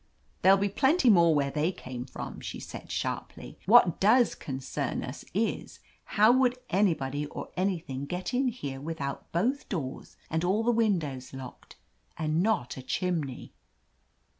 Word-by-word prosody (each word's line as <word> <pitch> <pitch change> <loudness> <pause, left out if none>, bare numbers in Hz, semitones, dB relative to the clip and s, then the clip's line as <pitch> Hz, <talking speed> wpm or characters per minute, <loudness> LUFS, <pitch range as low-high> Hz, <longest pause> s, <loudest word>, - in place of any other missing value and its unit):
"There'll 195 +1 +7
be 200 +1 +1
plenty 265 - +4
more 170 -4 +5
where 140 -1 +1
they 155 +4 +1
came 130 -8 -7
from," 130 - -7
she - - -6
said - - -9
sharply. - - -4
"What 210 -6 +6
does 235 +4 +5
concern 135 -2 -4
us - - -7
is - - -2
— - - -34
how 215 +3 +7
would 255 0 +3
anybody 150 -7 +1
or - - -7
anything 165 -8 -2
get 180 - -4
in 260 +2 +2
here 140 - -4
with 160 +2 -5 0.3
both 245 - 0
doors 145 -9 -5
and 160 +1 -1
all 195 +5 +2
the 240 - +3
windows 165 - 0
locked, 130 -2 -10 0.4
and 155 +1 0
not 195 - 0
a - - -6
chimney." 155 -2 -3
175 Hz, 155 wpm, -29 LUFS, 140-215 Hz, 0.4 s, There'll